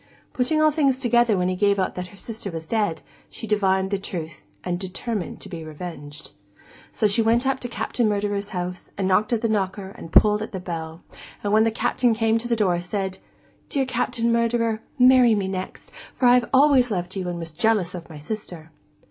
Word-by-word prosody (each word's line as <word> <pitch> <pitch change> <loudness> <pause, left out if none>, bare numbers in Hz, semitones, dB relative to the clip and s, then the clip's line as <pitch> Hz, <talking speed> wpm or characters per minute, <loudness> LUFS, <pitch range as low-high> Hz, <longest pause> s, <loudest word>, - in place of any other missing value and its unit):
Putting 260 +5 +1
all 310 0 +5
things 280 -4 +2
together 240 -4 +3
when 180 0 +1
he 185 - 0
gave 200 +1 +2
out 185 - 0
that 180 0 -5
her 200 - -15
sister 220 0 -7
was 165 -2 -7
dead, 210 -7 -1 0.3
she - - -7
divined 190 -2 +1
the 200 - 0
truth, 165 -5 -6 0.2
and 175 -1 -2
determined 190 +1 -4
to - - -8
be 165 -2 -7
revenged. 150 -2 -8 0.6
So, 220 - -1
she 210 +2 +3
went 230 +3 +2
up 270 0 +1
to 245 - -4
Captain 235 -1 -1
Murderer's 205 0 -1
house, 180 -2 -5
and 195 -1 0
knocked 195 +4 +2
at 230 -2 +1
the - - +3
knocker 195 -2 -1
and 165 -4 -11
pulled 210 +3 +5
at 215 - -6
the 190 - -3
bell, 165 -2 -6 0.4
and 205 0 0
when 220 +1 +5
the - - +3
Captain 230 +1 +1
came 225 0 +2
to 240 - -5
the 235 - +1
door, 185 -6 +1
said: 190 +1 -3 0.5
'Dear 275 -2 +1
Captain 245 -2 0
Murderer, 230 -1 +1 0.2
marry 250 -2 +6
me 200 -2 -1
next, 190 -1 -6 0.3
for 255 - +1
I 245 0 +6
always 270 -2 +5
loved 180 -2 -3
you 185 -2 -3
and 175 - -4
was 165 -1 -6
jealous 210 +1 +1
of 175 -2 -8
my 155 - -9
sister. 165 -1 -7
205 Hz, 205 wpm, -23 LUFS, 180-235 Hz, 0.6 s, marry